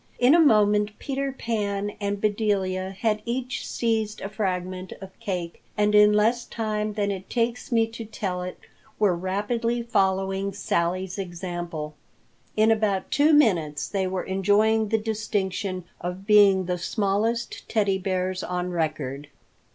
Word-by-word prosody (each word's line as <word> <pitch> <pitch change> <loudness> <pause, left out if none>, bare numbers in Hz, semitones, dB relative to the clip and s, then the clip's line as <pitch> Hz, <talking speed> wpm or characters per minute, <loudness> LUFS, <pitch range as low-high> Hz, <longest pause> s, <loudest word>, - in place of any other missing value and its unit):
In 250 +3 +5
a 340 - +6
moment 210 -7 +4
Peter 275 0 -2
Pan 205 -5 -2
and 200 -1 -2
Bedelia 200 -3 0
had 210 +2 -1
each 250 +2 -3
seized 220 -2 -1
a 195 - -4
fragment 185 -3 -3
of 195 -1 -11
cake 175 -4 -4 0.2
and 210 0 +2
in 210 0 +7
less 225 +3 +2
time 215 -1 -2
than 205 -1 0
it 190 -1 -6
takes 240 +1 -1
me 230 -1 +4
to 230 0 -7
tell 190 -4 -3
it 180 0 -6 0.4
were 200 -4 +3
rapidly 225 +6 -1
following 195 -3 0
Sally's 185 0 -1
example. 175 -4 -5 0.6
In 215 +1 +5
about 215 -4 0
two 295 +2 +4
minutes 175 - +3
they 195 -2 -1
were 185 0 -2
enjoying 210 +3 +2
the 225 - +3
distinction 205 -3 -2 0.2
of 180 +2 -5
being 200 -3 +6
the 180 0 -2
smallest 210 +5 -1
Teddy 200 -3 +1
Bears 185 0 -1
on 180 0 -2
record. 150 -4 -2
200 Hz, 145 wpm, -25 LUFS, 185-220 Hz, 0.6 s, in